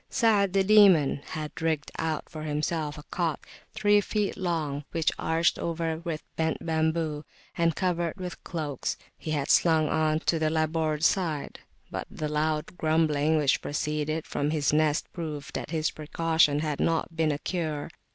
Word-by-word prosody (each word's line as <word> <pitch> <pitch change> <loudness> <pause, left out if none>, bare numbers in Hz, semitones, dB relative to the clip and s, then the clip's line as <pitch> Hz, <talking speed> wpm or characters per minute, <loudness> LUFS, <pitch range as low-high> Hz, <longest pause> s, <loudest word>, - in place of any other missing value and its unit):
Sa'ad 205 -5 +3
the 195 -1 +4
Demon 190 -8 +6
had 155 0 -6
rigged 160 -2 -1
out 160 -2 -2
for 155 - -8
himself 155 0 -2
a 150 - -9
cot 165 -5 -1 0.4
three 205 -1 +4
feet 205 0 -1
long, 160 -6 -2
which, 165 -2 +2
arched 165 +1 +1
over 165 -1 -2
with 165 -2 -4
bent 160 0 -1
bamboo, 160 -2 0 0.3
and 165 -2 +2
covered 175 -2 0
with 180 -2 -7
cloaks, 150 -6 -3 0.2
he - - -8
had 145 -2 0
slung 160 -3 +4
on 155 -1 +2
to 165 - +1
the 155 -1 +2
larboard 155 -1 0
side; 165 -6 0 0.3
but - - -4
the 155 - -4
loud 150 +2 -1
grumbling 155 -1 +2
which 145 -3 +2
proceeded 150 +1 -2
from 145 +1 -1
his 150 -2 +1
nest 150 -1 +2
proved 155 -4 -5
that - - -4
his 160 -1 0
precaution 155 -1 +2
had 150 -2 -2
not 165 0 0
been 160 -1 +2
a 145 - -1
cure. 155 -2 -3
160 Hz, 160 wpm, -27 LUFS, 150-165 Hz, 0.4 s, Demon